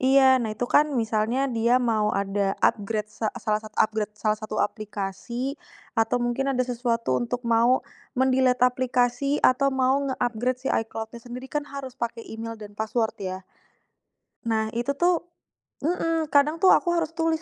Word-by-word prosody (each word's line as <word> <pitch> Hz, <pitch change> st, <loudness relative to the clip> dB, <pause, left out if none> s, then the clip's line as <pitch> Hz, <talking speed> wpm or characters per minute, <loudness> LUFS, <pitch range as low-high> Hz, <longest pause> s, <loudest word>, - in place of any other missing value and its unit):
Iya, 265 Hz, -1 st, +5 dB
nah 220 Hz, -, -2 dB
itu 215 Hz, +3 st, -2 dB
kan 300 Hz, +4 st, +4 dB
misalnya 225 Hz, +4 st, +1 dB
dia 235 Hz, +2 st, +3 dB
mau 220 Hz, -4 st, +1 dB
ada 195 Hz, 0 st, 0 dB
upgrade, 210 Hz, 0 st, +1 dB
sa 220 Hz, -, -2 dB
salah 215 Hz, -2 st, 0 dB
satu 215 Hz, 0 st, -12 dB
upgrade 215 Hz, -1 st, +1 dB
salah 215 Hz, +1 st, +1 dB
satu 215 Hz, 0 st, -5 dB
aplikasi, 215 Hz, +5 st, -3 dB, 0.4 s
atau 225 Hz, +1 st, +2 dB
mungkin 240 Hz, +3 st, 0 dB
ada 255 Hz, -1 st, +1 dB
sesuatu 235 Hz, -2 st, -1 dB
untuk 245 Hz, +1 st, -3 dB
mau 235 Hz, +2 st, +4 dB, 0.4 s
men-delete 260 Hz, -1 st, +3 dB
aplikasi, 250 Hz, +3 st, +1 dB
atau 275 Hz, +2 st, +5 dB
mau 265 Hz, +1 st, +2 dB
nge-upgrade 245 Hz, -1 st, -1 dB
si 265 Hz, -, -4 dB
icloudnya 225 Hz, +1 st, -3 dB
sendiri 250 Hz, +2 st, -8 dB
kan 295 Hz, 0 st, 0 dB
harus 270 Hz, -2 st, -7 dB
pakai 235 Hz, -2 st, -4 dB
email 225 Hz, 0 st, -6 dB
dan 205 Hz, -1 st, -10 dB
password 220 Hz, +1 st, -1 dB
ya, 185 Hz, -1 st, -3 dB, 1.0 s
nah 220 Hz, -1 st, 0 dB
itu 240 Hz, +4 st, 0 dB
tuh 350 Hz, 0 st, +3 dB, 0.6 s
mhm, 330 Hz, 0 st, 0 dB
kadang 300 Hz, +4 st, +3 dB
tuh 380 Hz, -, +6 dB
aku 345 Hz, -2 st, +1 dB
harus 330 Hz, -2 st, 0 dB
tulis 325 Hz, -1 st, +1 dB
240 Hz, 160 wpm, -25 LUFS, 220-265 Hz, 1.0 s, tuh